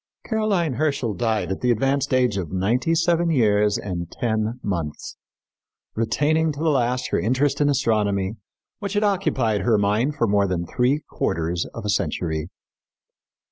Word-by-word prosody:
Caroline 205 - 0
Herschel 140 -5 0
died 110 -5 -1
at 95 - -3
the 125 - +1
advanced 135 +4 +1
age 125 -4 +2
of 90 -6 -3
ninety 115 - +1
seven 170 +1 +2
years 105 -7 +3
and 85 -3 -5
ten 110 +1 -1
months, 85 -7 -4 0.8
retaining 150 +8 +1
to 145 - -9
the 160 0 +2
last 125 -2 0
her - - +1
interest 130 +7 +1
in 145 - +3
astronomy 105 -7 +1 0.5
which 200 -1 -4
had 205 +1 +1
occupied 135 - +1
her 115 -3 +3
mind 105 +8 +1
for 115 - +1
more 100 -2 +2
than 90 -2 -2
three 130 - 0
quarters 85 +1 -2
of - - -6
a - - -2
century. 80 -5 -1
120 Hz, 155 wpm, -23 LUFS, 100-145 Hz, 0.8 s, years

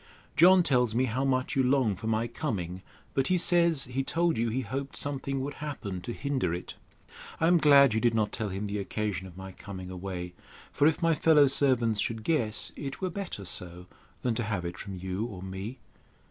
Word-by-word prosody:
John 180 +2 +7
tells 125 -7 +2
me 130 +2 +3
how 130 +2 -1
much 130 -1 0
you 135 - +3
long 130 -5 +2
for 110 - -7
my 110 +1 +1
coming; 95 - -4 0.3
but 135 -1 +1
he 185 - +2
says, 170 -4 +4
he 125 +2 -2
told 170 +3 +1
you 115 +1 0
he 125 +4 -1
hoped 135 +4 -5
something 135 -1 -2
would 140 +2 -4
happen 105 -11 -5
to 120 - -5
hinder 130 - -1
it. 90 - -7 0.7
I 160 - +2
am 175 +1 +5
glad 140 -5 +6
you 110 - +1
did 120 -1 +2
not 105 -2 +1
tell 110 -2 -3
him 95 +2 -4
the 105 0 -3
occasion 100 -2 -3
of 90 -1 -14
my 95 0 -8
coming 95 -2 -9
away; 90 -1 -6 0.4
for 145 - +3
if 160 +1 0
my 165 0 +4
fellow 155 -1 +5
servants 125 -5 +2
should 110 +1 -2
guess, 115 -9 -1
it 135 -2 -6
were 185 -1 -2
better 180 - -6
so, 90 0 -2 0.4
than 125 - +1
to 120 - -2
have 100 -5 -3
it 85 0 -6
from 100 -2 -7
you 95 +3 -3
or 100 -6 -8
me. 95 +6 -6
120 Hz, 210 wpm, -28 LUFS, 100-140 Hz, 0.7 s, John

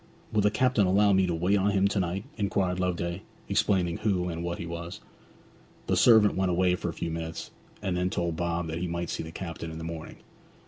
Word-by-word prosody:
'Will 105 - +3
the 105 - +4
captain 120 -3 +2
allow 100 +2 +4
me 95 -1 +3
to 85 - 0
wait 90 +5 +2
on 100 +2 +2
him 100 -1 +3
to 100 - 0
night?' 90 +2 -1
inquired 95 -3 0
Loveday, 85 0 -1 0.3
explaining 90 -4 +1
who 95 -4 0
and 85 0 -4
what 85 0 -3
he - - -5
was. 85 0 -6 0.9
The - - +1
servant 110 -3 +6
went 95 -1 +1
away 90 +1 +3
for 90 - -3
a - - -4
few 85 - -4
minutes, 80 0 -5 0.3
and 95 -3 -1
then 90 +1 0
told 85 -3 -1
Bob 85 0 -1
that 80 +1 -4
he 90 - -2
might 85 0 -3
see - - -3
the 80 - -7
captain 85 -1 -6
in 80 - -7
the 80 - -6
morning. 80 -1 -6
90 Hz, 225 wpm, -28 LUFS, 85-95 Hz, 0.9 s, servant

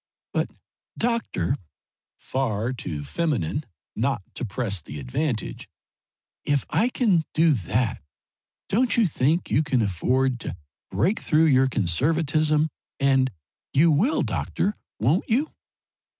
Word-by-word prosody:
But, - - 0 0.5
doctor," 230 - 0 0.6
far 120 -2 -1
too 80 - -5
feminine 145 - -1 0.3
not - - 0
to - - -6
press 100 -4 -2
the 75 0 -8
advantage 105 - -3 0.7
"if 145 -2 +1
I 180 +11 +3
can 205 -10 +2
do 160 0 +5
that, 115 - 0 0.7
don't 235 +2 +2
you 230 - +5
think 160 +1 +1
you - - +4
can 135 -6 +1
afford 125 +7 +1
to 90 - -5 0.3
break 125 - +1
through 160 +1 +3
your 135 -3 +5
conservatism 150 - +1 0.3
and 135 -1 +3 0.4
you 160 +4 +5
will, 210 - +2
doctor, 205 - -1 0.2
won't 135 - +2
you?" 270 +8 +1
135 Hz, 120 wpm, -25 LUFS, 115-165 Hz, 0.7 s, do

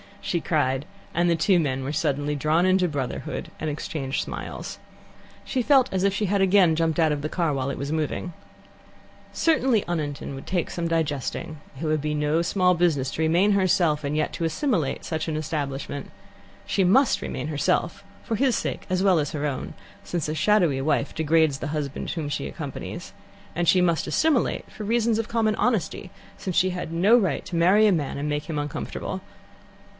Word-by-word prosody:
she 175 - -1
cried, 140 -4 0 0.3
and 175 0 +2
the 170 - +3
two 180 +3 +3
men 135 -4 -1
were 135 - -3
suddenly 145 -1 0
drawn 155 +4 +2
into 185 -1 +3
brotherhood, 140 -5 -4
and 155 - -2
exchanged 145 -2 -3
smiles. - - -6 0.6
She 260 - -1
felt 265 0 +4
as 190 -1 0
if 200 -1 +3
she 210 +2 0
had 200 0 +1
again 190 -4 +5
jumped 165 0 0
out 160 -2 +4
of 145 -1 -1
the 155 - -3
car 165 -3 0
while 135 0 -1
it - - -4
was 140 +2 -4
moving. 160 +3 -2 1.0
Certainly 260 -9 +2
Oniton 150 -5 -3
would 135 - -9
take 180 -3 -1
some 170 -1 -2
digesting. 155 0 -2 0.2
It 165 - -3
would 155 -1 +1
be 150 +1 -1
no 150 +2 +1
small 180 +1 +3
business 160 -7 +1
to - - -3
remain 170 +6 +3
herself, 175 -6 +2
and 145 +1 -2
yet 155 - 0
to - - -4
assimilate 165 - -1
such 160 -1 -3
an 160 - -2
establishment. 145 -2 -4 0.6
She 195 - +1
must 245 +9 +4
remain - - -4
herself, 160 +5 0 0.2
for 225 - -2
his 255 +1 +2
sake - - -3
as 185 +1 +1
well 190 -4 +4
as 145 -2 -1
her 150 -1 -3
own, 135 -3 -3 0.3
since 170 -4 -3
a - - -1
shadowy 165 -5 +3
wife 140 0 0
degrades 160 -2 +2
the - - -4
husband 145 -2 -3
whom 155 -4 -3
she 70 - -3
accompanies; 70 - -7 0.4
and 175 0 0
she 180 +3 +5
must 170 -2 +1
assimilate 305 -6 +1
for 215 - -8
reasons 225 +1 +1
of 225 - -2
common 220 -2 +1
honesty, 200 -5 -1 0.3
since 185 -3 -4
she 185 0 +3
had 180 -3 -5
no 195 +8 +5
right 200 -6 0
to 175 - -5
marry 185 +6 +5
a 210 - +5
man 150 -7 -1
and 145 +1 -2
make 150 0 -2
him 160 -3 -4
uncomfortable. 145 -1 -4
165 Hz, 190 wpm, -25 LUFS, 150-190 Hz, 1.0 s, again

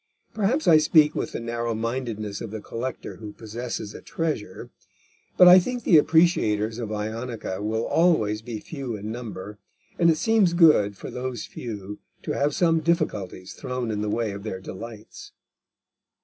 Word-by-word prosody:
Perhaps 225 +8 0
I 155 -2 +8
speak 155 -1 +5
with - - -3
the - - -3
narrow 115 0 -3
mindedness 110 -3 -3
of 115 - -5
the 110 +1 -6
collector 120 +5 -6
who 105 -1 -9
possesses 110 -1 -6
a - - -10
treasure; 150 - -4 0.7
but 180 - +9
I 180 +1 +10
think 245 +5 -4
the 170 - +6
appreciators 115 -10 +2
of 115 -3 -4
Ionica 110 -1 -4
will 110 +2 -1
always 110 -12 +2
be 110 -1 -6
few 135 -5 -6
in 105 +1 -6
number, 105 -4 -7 0.4
and 170 - +5
it 160 - +3
seems 205 -1 +3
good 150 - +5
for - - -8
those 125 -1 -4
few 105 -3 -7 0.2
to - - -3
have 145 +1 0
some 165 -2 +3
difficulties 150 - -2
thrown 125 -3 -4
in 105 -1 -2
the 105 - -1
way 115 0 -1
of 100 0 -7
their 100 -3 -5
delights. 110 +3 -10
115 Hz, 165 wpm, -25 LUFS, 105-155 Hz, 0.7 s, I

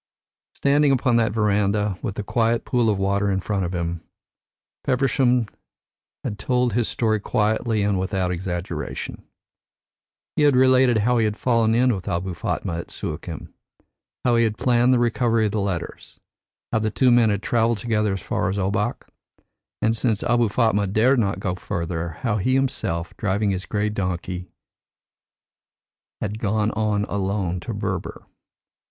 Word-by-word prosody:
Standing 145 +1 +3
upon 125 -2 +2
that 115 -2 +2
verandah, 105 -1 +1
with 105 -7 -4
the 105 - -3
quiet 115 +2 0
pool 120 -2 +2
of 105 - +1
water 100 +1 +1
in 95 -1 +1
front 95 -1 -1
of 85 - -3
him, 85 -1 -3 0.8
Feversham 125 -2 +2 0.8
had 105 - -4
told 125 +1 +1
his 120 0 +1
story 110 -2 0
quietly 110 0 0
and 100 -2 +1
without 95 -1 -1
exaggeration. 90 0 -4 1.1
He - - +1
had 145 -3 +5
related 130 -2 +5
how 120 +3 +2
he 110 - +3
had 105 0 -1
fallen 115 -3 +2
in 125 +1 +3
with 95 -3 -6
Abou 90 +2 -2
Fatma 85 0 -3
at - - -8
Suakin, - - -6 0.7
how 120 -1 +4
he 115 - +4
had 110 -2 0
planned 120 0 +3
the 130 - +4
recovery 115 -1 +2
of 105 - 0
the 105 0 -1
letters, 90 -4 -5 0.5
how 110 - +2
the 110 0 0
two 125 +4 +3
men 120 -2 +5
had 100 0 -1
travelled 115 -1 +2
together 105 -1 0
as 95 - -6
far 105 -5 -1
as 100 - -2
Obak, 105 +4 -1 0.8
and 110 +1 +3
since 110 -3 0
Abou 120 -2 +2
Fatma 105 -2 +2
dared 115 +7 +3
not 100 -3 0
go 95 -2 -2
farther, 85 -3 -4
how 115 -4 0
he 130 +6 +1
himself, 85 -11 -1
driving 100 0 0
his 95 0 -4
grey 105 0 0
donkey, 90 -3 -3 1.7
had 105 +1 -4
gone 105 0 0
on 105 -1 0
alone 95 -3 -2
to - - -5
Berber. - - -4
105 Hz, 160 wpm, -23 LUFS, 95-120 Hz, 1.7 s, had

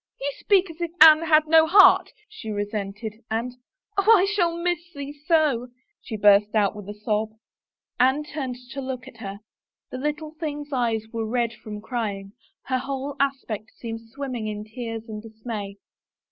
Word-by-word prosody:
"You 280 +1 -2
speak 385 -3 +3
as 325 +2 -13
if 340 - -1
Anne 310 0 +9
had 310 -1 +5
no 320 0 +6
heart," 395 +4 +7 0.2
she 420 - -9
cesented, 205 +1 -4
and, 230 +3 -2 0.3
" - - -46
Oh, 405 +3 +5
I 370 - +3
shall 355 -5 +1
miss 350 -1 0 0.2
thee 285 0 -6
so! 295 -5 +1 0.2
" - - -50
she 220 - -6
burst 205 +1 +5
out 205 -1 +2
with 205 -1 -9
a 205 - -6
sob. 215 0 -1 0.7
Anne 265 +4 +3
turned 280 -4 -5 0.2
to 275 - -5
look 260 -1 -5
at 250 - -13
her. 200 -2 -7 0.5
The 255 - -5
little 300 +2 -3
thing's 295 -2 -5
eyes 230 -4 0
were 225 -1 -2
red 235 -1 0
with 210 -1 -7
crying; 205 -5 -4 0.3
her 260 -1 -1
whole 275 +1 -4
aspect 260 -6 -2
seemed 225 -1 -6
swim 275 +2 -6
ming 230 -3 -3
in 210 -1 -4
tears 225 0 -6
and 215 -1 -6
dismay. 220 -2 -7
250 Hz, 180 wpm, -24 LUFS, 215-295 Hz, 0.7 s, Anne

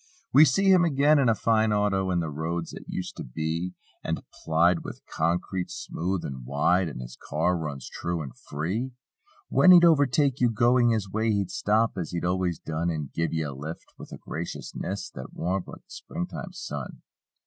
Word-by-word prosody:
We 150 +3 +9
see 195 +8 +3
him 185 -2 +6
again, 150 -1 +4
in 130 -4 +4
a 115 - +3
fine 110 +1 +2
auto; 100 -2 +1
And 90 -2 +1
the 80 - -4
roads 80 +3 -3
that - - -9
used 90 - -4
to - - -5
be 80 +7 -3 0.3
And - - -2 0.2
plied 85 +2 +3
with - - -9
concrete, 90 +3 -1
smooth 90 +2 -3
and 65 -2 -6
wide. 85 +7 +2
And 60 -4 -7
his - - -8
car 90 - 0
runs 75 -5 -5
true 85 -2 -3
and 65 - -9
free. 95 - -3 0.6
When 185 - +5
he'd 175 -1 +9
overtake 140 -3 +3
you 125 - +4
going 120 +2 +4
his 110 -4 0
way 110 +2 0
He'd 100 -4 0
stop 110 -1 +1
as 85 - -3
he'd 85 0 -2
always 90 -2 0
done 80 +2 -2
And 75 -4 -4
"give 85 0 -1
ye 80 -1 -1
a 75 -2 -4
lift" 75 +5 -8
with - - -10
a - - -7
graciousness 95 +3 -5
That 65 - -9
warmed 90 +1 -2
like - - -11
the - - -24
springtime 175 +2 -6
sun. 75 - -7
90 Hz, 190 wpm, -27 LUFS, 80-115 Hz, 0.6 s, We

